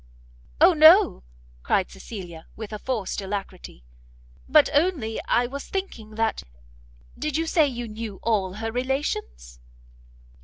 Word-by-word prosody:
"O 345 +4 +7
no!" 330 +5 +6 0.4
cried - - 0
Cecilia, 170 - -9
with 220 -1 -8
a 210 - -5
forced 215 -6 -3
alacrity, 195 - -6 0.7
"but 300 +1 +6
only 290 -8 0
I 245 - +2
was 275 +3 -6
thinking 235 - -5
that 225 0 0 0.8
did 305 -1 -1
you 325 - 0
say 320 -2 +3
you 240 -3 -5
knew 215 -2 -7
all 200 -5 0
her 225 +2 -4
relations?" 140 - -3
225 Hz, 125 wpm, -24 LUFS, 200-290 Hz, 0.8 s, O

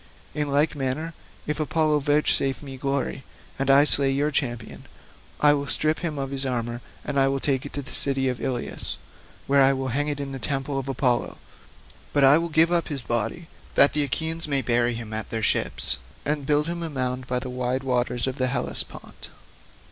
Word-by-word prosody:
In 150 -1 -2
like 145 +2 +2
manner, 145 +4 -3 0.3
if 150 +1 -2
Apollo 155 0 +1
vouchsafe 145 -1 +1
me 135 -2 -8
glory 135 0 -2 0.4
and 135 0 0
I 140 +1 +7
slay 140 -2 +4
your 145 +3 +1
champion, 120 -6 -3 0.5
I 150 0 +6
will 140 -1 -2
strip 155 +2 +1
him 160 -4 -3
of 135 -1 -3
his 135 0 0
armour 120 -2 -2 0.2
and 145 - -3 0.3
take 135 -1 0
it - - -14
to 145 - -4
the 135 - -10
city 135 -1 0
of 125 -3 -2
Ilius, 125 -2 -2 0.5
where 140 0 +4
I 135 0 +5
will 135 0 -3
hang 145 +4 0
it 145 -1 -2
in 140 -1 -4
the 135 - -5
temple 135 +2 -2
of 135 0 -6
Apollo, 125 -2 0 0.8
but 145 - +3
I 135 +3 +7
will 170 0 -3
give 160 +2 +4
up 170 -2 +2
his 140 -5 -5
body, 120 +9 -2 0.3
that 140 - +6
the 150 - +2
Achaeans 160 +4 -1
may 140 -2 +1
bury 120 0 +2
him 115 -2 -6
at 110 0 -3
their 110 -1 -3
ships, - - +1 0.3
and 150 +2 +1
then 145 - -10
build 150 +1 +2
him 170 +1 -4
a 165 - -3
mound 130 -2 -2
by 125 - 0
the 125 0 -4
wide 125 +1 -2
waters 125 -2 0
of 130 0 -4
the 130 - +3
Hellespont. 125 -1 -2
135 Hz, 200 wpm, -25 LUFS, 130-150 Hz, 0.8 s, I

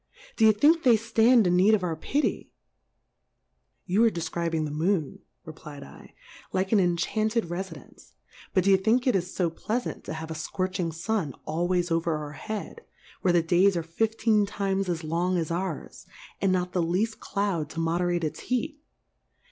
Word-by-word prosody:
D'ye 220 -1 +6
think 300 +10 +4
then 250 -5 +5
they - - +5
ftand 225 +1 +4
in 180 0 +3
need 200 +4 +5
of 200 - -3
our 170 -3 -1
Pitty? 290 - -1 1.4
You 200 +5 +2
are 230 - +6
defcribing 165 -3 -2
the 150 - -4
Moon, 160 0 -1 0.3
reply 155 -2 -10
^ 140 - -13 0.2
/, - - -20
like 190 +1 0
an 215 - +5
enchanted 215 +4 0
Refidence; 175 - -8 0.4
but 185 - +2
d'ye 195 0 +5
think 225 +6 +2
it 255 - +3
is 180 -1 -2
fo 175 -3 +1
pleafant 230 +8 -3
to - - -5
have 160 0 -6
a - - -2
fcorching 180 +2 -3
Sun 165 - -2
always 175 +2 0
over 165 -1 +1
our 150 -1 -6
Head, 215 - -6 0.4
where 185 - +3
the 175 -1 +3
Days 180 +3 +3
arc 165 - -3
fifteen 220 +3 +1
times 195 -1 -1
as 170 -2 -2
long 175 +4 0
as 165 -1 -2
ours, 185 +3 -4 0.3
and 195 - +2
not 180 -1 0
the 180 - +1
leaft 190 +7 -1
Cloud 190 -7 -2
to 165 - -6
mo 165 +1 0
derate 175 -1 0
its 155 - -3
Heat 295 +4 -3
180 Hz, 180 wpm, -27 LUFS, 165-215 Hz, 1.4 s, D'ye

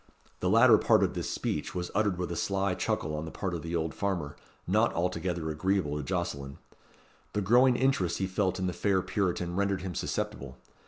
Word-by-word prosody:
The 90 - 0
latter 115 +2 +7
part - - +4
of - - 0
this - - -3
speech - - -3
was 90 -1 -3
uttered 105 -4 +1
with 90 -1 -3
a - - -2
sly 100 +2 0
chuckle 75 -3 -2
on 75 +1 -4
the - - -6
part 95 +2 -4
of 85 - -3
the 85 +2 -4
old 80 -1 -1
farmer, 90 -8 -2 0.3
not - - +3
altogether 85 -2 -1
agreeable 90 -1 0
to 75 - -2
Jocelyn. 70 -5 -3 0.8
The 105 - 0
growing 125 +6 +5
interest 130 -9 +1
he 95 - 0
felt 95 0 0
in 95 - -2
the 90 - -1
fair 95 -1 +1
Puritan 90 -2 -1
rendered 100 -1 0
him 95 -2 -4
susceptible. 65 -4 -4
90 Hz, 200 wpm, -29 LUFS, 85-100 Hz, 0.8 s, latter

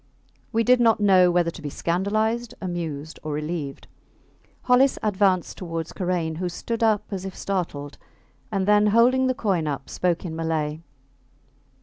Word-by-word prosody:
We 230 -1 +2
did 250 +1 +4
not 230 -2 +4
know 190 -3 +5
whether 175 -1 +2
to - - -11
be 145 - -4
scandalized, 215 +9 -1
amused, 165 -5 -5
or 155 -1 -4
relieved. 150 -2 -4 0.8
Hollis 260 +2 +4
advanced 195 -4 +1
towards 165 -3 -5
Karain, 175 -4 -2
who 180 +1 -2
stood 230 +6 -4
up 220 -2 +3
as 190 -2 -4
if 195 -1 -7
startled, 150 -7 -4 0.5
and 195 -2 -1
then, 210 0 +5
holding 245 +5 +4
the 255 - 0
coin 185 -9 0
up, 140 -2 -4
spoke 175 0 -1
in 160 -2 -4
Malay. 160 -2 -2
185 Hz, 150 wpm, -24 LUFS, 165-215 Hz, 0.8 s, know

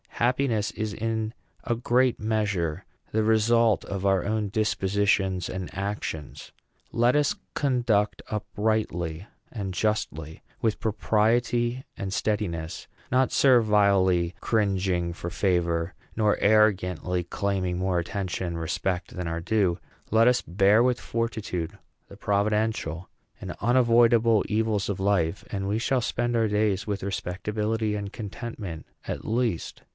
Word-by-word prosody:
Happiness 120 -3 +1
is 110 -1 -4
in 110 0 -2 0.3
a 120 - 0
great 125 +1 +2
measure 105 -7 -1 0.3
the 110 0 +1
result 110 0 +3
of 100 0 -4
our 95 -2 +3
own 105 0 -1
dispositions 100 -3 +1
and 95 -1 -5
actions. 100 -6 -5 0.4
Let 120 +2 +3
us 150 -1 +2 0.2
conduct 120 -7 +1
uprightly 100 -6 -2 0.3
and 100 -5 -4
justly; 80 -7 -2 0.2
with 110 -2 0
propriety 120 +3 +1
and 95 -3 -4
steadiness; 90 -7 -2 0.2
not 130 +1 +3
servilely 100 -8 +4
cringing 95 -5 +1
for 85 0 -6
favor, 85 -2 0 0.2
nor 105 -2 +2
arrogantly 95 -4 +2
claiming 90 0 -2
more 95 -1 0
attention 95 +1 -2
and 85 -1 -4
respect 90 +2 -2
than 90 -1 -3
our 85 0 -3
due; 95 -2 +1 0.3
let 115 +2 +5
us 125 0 +4
bear 100 +6 +4
with 125 -1 +2
fortitude 110 -8 -3 0.3
the - - -12
providential 105 -5 0 0.3
and - - -6
unavoidable 115 -2 +4
evils 110 -1 0
of 100 - -2
life, 95 -3 +1
and 95 -1 -2
we 105 +2 0
shall 130 +2 +1
spend 120 0 -1
our 115 -1 +3
days 105 -2 +1
with 100 -2 -2
respectability 105 +3 -2
and 100 -1 -5
contentment 105 -5 -6 0.2
at - - -4
least. 115 -6 -1
105 Hz, 125 wpm, -26 LUFS, 95-110 Hz, 0.4 s, let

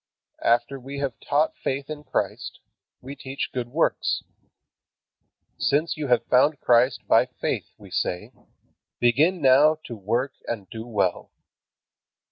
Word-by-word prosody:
After 120 +4 +2
we 135 +2 -8
have 140 -4 -3
taught 150 +2 +1
faith 135 +1 -2
in 150 -1 -7
Christ, - - -3 0.4
we 135 +3 -8
teach 135 0 -5
good 125 -2 -3
works. 150 +7 0 1.4
"Since 155 +3 +1
you 150 -2 -4
have 125 -2 +2
found 140 +4 +3
Christ 120 +1 +3
by - - +5
faith," - - -3
we - - -15
say, 90 - -2 0.7
"begin 150 +8 +3
now 140 +4 +6
to 120 - -6
work 115 +7 -1
and 105 -5 -4
do 115 0 -7
well. 100 -6 -1
130 Hz, 130 wpm, -25 LUFS, 120-145 Hz, 1.4 s, now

